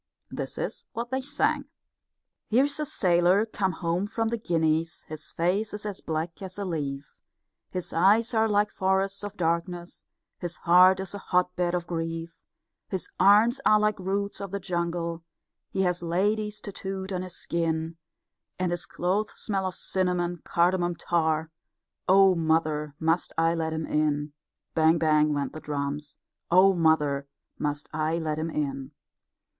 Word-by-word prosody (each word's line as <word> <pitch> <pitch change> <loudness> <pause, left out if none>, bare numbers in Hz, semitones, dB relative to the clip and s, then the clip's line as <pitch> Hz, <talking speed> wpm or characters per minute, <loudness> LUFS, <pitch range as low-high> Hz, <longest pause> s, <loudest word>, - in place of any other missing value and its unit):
This - - -5
is - - -4
what 235 +2 -4
they 265 0 0
sang: 265 - 0 0.8
Here's 280 +6 +2
a 300 - -1
sailor 180 +2 +3
come 195 -4 -1
home 170 +3 -1
from 225 +1 -1
the 235 - -1
Guineas, 160 -3 0
His 155 0 -8
face 195 +6 0
is 210 - -8
as 205 -2 -4
black 160 +3 -3
as 190 0 -7
a 200 - -3
leaf, 145 -5 -4 0.5
His 180 -1 -5
eyes 210 +8 +4
are 220 0 +3
like 210 0 +2
forests 195 +1 0
of 205 0 -6
darkness, 170 +1 -2 0.4
His 175 -1 -3
heart 185 +2 +6
is 190 - -6
a 200 - -5
hotbed 180 -1 0
of 175 -1 -2
grief, 165 0 -4 0.5
His 190 -2 -4
arms 210 +6 +5
are 215 - +5
like 210 -1 +1
roots 200 +2 -2
of 200 - -4
the 200 +2 -3
jungle, 170 -2 -2 0.5
He 190 - 0
has 180 -1 0
ladies 210 +5 0
tattooed 195 -1 -5
on 180 - -1
his 185 -1 -7
skin, 165 -1 -2 0.6
And 180 -1 0
his 175 - -2
clothes 195 +4 -1
smell 195 -3 -1
of 185 - -5
cinnamon 180 -2 0
cardamom 175 0 +1
tar. 160 -1 0 0.6
Oh, 195 0 +7
mother, 155 -3 0
must 165 +2 +1
I 165 0 +3
let 160 -1 -1
him 160 0 -2
in? 150 -1 0 0.4
Bang! 160 +1 +4
Bang! 155 -1 +3
[went 140 -2 -2
the 155 - -6
drums], 145 0 -4 0.3
Oh, 185 +3 +6
mother, 150 -5 +2 0.3
must 145 0 -2
I 155 +1 0
let 155 -2 -2
him 160 +1 -2
in? 140 -2 -3
175 Hz, 155 wpm, -27 LUFS, 160-195 Hz, 0.8 s, Oh